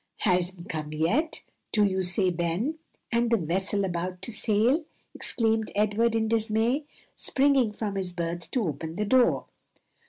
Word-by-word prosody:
"Hasn't 180 -1 0
come 155 -2 -4
yet, 215 - 0 0.3
do 210 - +3
you 190 -1 0
say, 180 +1 +2
Ben? 175 - -1 0.3
and 235 0 +2
the 230 - +4
vessel 190 +3 0
about 180 0 -4
to - - -4
sail?" 230 +8 +2 0.3
exclaimed 225 -2 0
Edward 215 +3 +2
in 220 -1 +1
dismay, 225 +5 +1 0.3
springing 270 -4 +2
from 210 -1 -4
his 190 -2 -2
berth 170 -1 -4
to 250 - 0
open 160 +2 -4
the 210 - -1
door. 250 +3 +3
205 Hz, 150 wpm, -27 LUFS, 180-230 Hz, 0.3 s, the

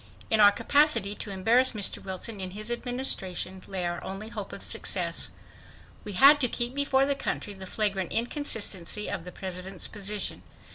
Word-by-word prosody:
In 220 - +4
our 205 -1 +8
capacity 235 -1 +3
to - - -5
embarrass 230 +7 +3
Mr. 205 -3 +3
Wilson 195 +2 -5
in 185 - -4
his 215 +2 -3
Administration, 235 -7 -1
lay 190 -2 -3
our 175 0 -3
only 195 +3 -7
hope - - -7
of - - -8
success. - - -1 0.7
We 205 - -6
had 280 +8 +7
to 250 - +3
keep 240 +1 0
before 275 -1 +2
the 280 - +1
country 220 -6 -4
the 190 -1 -9
flagrant 195 -3 -1
inconsistency 220 - -1
of 170 - -5
the 180 - -7
President's 185 0 -7
position. 205 -1 -3
210 Hz, 170 wpm, -27 LUFS, 190-245 Hz, 0.7 s, our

